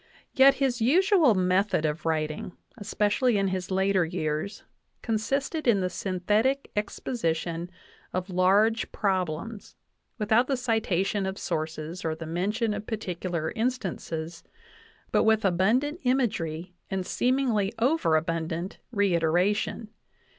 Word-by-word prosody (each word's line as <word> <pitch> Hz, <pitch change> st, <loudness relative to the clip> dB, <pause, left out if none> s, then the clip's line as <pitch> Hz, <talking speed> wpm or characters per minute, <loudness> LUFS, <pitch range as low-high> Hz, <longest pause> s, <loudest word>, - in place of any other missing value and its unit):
Yet 270 Hz, +1 st, +6 dB
his 260 Hz, -3 st, 0 dB
usual 325 Hz, -, +4 dB
method 185 Hz, -2 st, +2 dB
of 155 Hz, +2 st, -2 dB
writing, 155 Hz, +2 st, -2 dB, 0.2 s
especially 210 Hz, +2 st, +1 dB
in 195 Hz, -1 st, +1 dB
his 185 Hz, -1 st, -3 dB
later 190 Hz, -1 st, +2 dB
years, 160 Hz, +2 st, -3 dB, 0.4 s
consisted 270 Hz, +7 st, -1 dB
in 205 Hz, -5 st, +4 dB
the 180 Hz, 0 st, -1 dB
synthetic 210 Hz, +10 st, 0 dB
exposition 175 Hz, -5 st, -2 dB, 0.4 s
of 185 Hz, +1 st, -3 dB
large 200 Hz, +5 st, +3 dB
problems, 190 Hz, +1 st, -2 dB, 0.4 s
without 220 Hz, +3 st, +3 dB
the 270 Hz, -, 0 dB
citation 205 Hz, -5 st, 0 dB
of 190 Hz, +1 st, -4 dB
sources 155 Hz, +3 st, -4 dB
or 160 Hz, -1 st, -1 dB
the 165 Hz, +1 st, -7 dB
mention 205 Hz, +7 st, -1 dB
of 210 Hz, -, -6 dB
particular 180 Hz, -6 st, -3 dB
instances, 175 Hz, -9 st, -3 dB, 0.7 s
but -, -, +3 dB
with 220 Hz, -1 st, +3 dB
abundant 230 Hz, -, +2 dB
imagery 180 Hz, -10 st, -1 dB, 0.2 s
and 190 Hz, -1 st, -2 dB
seemingly 245 Hz, -6 st, +1 dB
overabundant 165 Hz, -, 0 dB
reiteration. 200 Hz, +2 st, +1 dB
195 Hz, 110 wpm, -27 LUFS, 170-230 Hz, 0.7 s, Yet